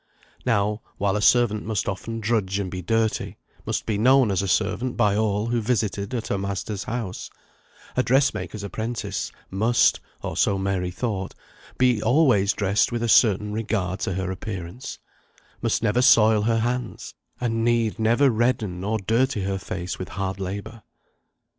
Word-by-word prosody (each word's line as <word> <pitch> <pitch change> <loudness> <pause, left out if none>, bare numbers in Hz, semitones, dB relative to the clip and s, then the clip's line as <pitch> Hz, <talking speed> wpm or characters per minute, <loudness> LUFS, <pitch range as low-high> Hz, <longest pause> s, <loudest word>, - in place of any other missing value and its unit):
Now, 105 -2 +1 0.2
while 100 0 +1
a 105 - 0
servant 110 -1 +3
must 110 -1 -2
often 115 +3 -4
drudge 105 -3 0
and 95 -3 -3
be 90 - -4
dirty, 115 +3 -1 0.3
must - - -2
be 105 -2 -1
known 130 -1 +5
as 95 - +1
a 100 - -2
servant 110 +6 0
by 105 -4 +3
all 105 -1 +1
who 120 0 0
visited 110 -1 -1
at 115 - -4
her 100 - 0
master's 100 0 -4
house, 115 -6 -4 0.7
a 130 - +3
dressmaker's 130 -5 +1
apprentice 110 +3 -4 0.2
must 110 +5 +3 0.2
(or - - -4
so 100 - +2
Mary 95 -2 -1
thought) 95 0 -3 0.4
be 125 -4 +3
always 120 -5 +4
dressed 100 +2 +1
with 120 -1 -2
a - - +1
certain 105 -2 +4
regard 105 -4 -2
to 95 0 -2
appearance; 95 +3 -6 0.6
must - - 0
never 115 +2 +2
soil 110 -3 +6
her 115 +1 +1
hands, 120 0 -3 0.3
and 115 -2 -1
need 115 -1 +1
never 120 +5 +4
redden 110 -6 0
or 110 +2 0
dirty 115 +2 0
her 95 0 -2
face 90 -1 -5
with 95 - -5
hard 95 0 -3
labour. 100 +4 -5
110 Hz, 160 wpm, -24 LUFS, 100-115 Hz, 0.7 s, soil